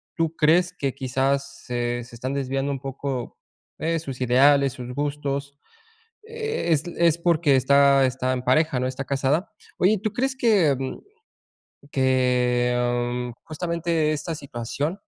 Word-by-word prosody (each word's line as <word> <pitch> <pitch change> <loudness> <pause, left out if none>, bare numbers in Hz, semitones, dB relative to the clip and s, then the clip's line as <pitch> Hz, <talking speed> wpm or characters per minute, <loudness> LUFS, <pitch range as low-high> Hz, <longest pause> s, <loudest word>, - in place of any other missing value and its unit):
tú 165 -1 -1
crees 175 +4 +3
que 135 -2 -1
quizás 135 +1 -1
se 120 -1 -2
se 120 0 -13
están 130 +3 -4
desviando 135 +1 -1
un 135 - -3
poco, 135 -1 -5 0.4
eh, 165 0 0
sus 135 -5 -7
ideales, 135 +2 +4
sus 125 -1 -7
gustos 140 -1 -3 0.7
es 445 - -1
es 170 -1 +3
porque, 165 -5 +3
está 140 +1 +5
está 130 0 -1
en 125 -1 -2
pareja, 135 +2 +2
¿no? 125 - -1
Está 130 +1 -4
casada. 140 +9 0 0.3
Oye, 205 +4 +3
¿tú 215 - -1
crees 265 +1 -1
que, 200 - +3
mm, 135 -1 -4 0.9
que 125 -1 +1
justamente 165 -1 -1
esta 155 +2 -4
situación, 145 - -4
140 Hz, 135 wpm, -24 LUFS, 130-160 Hz, 0.9 s, está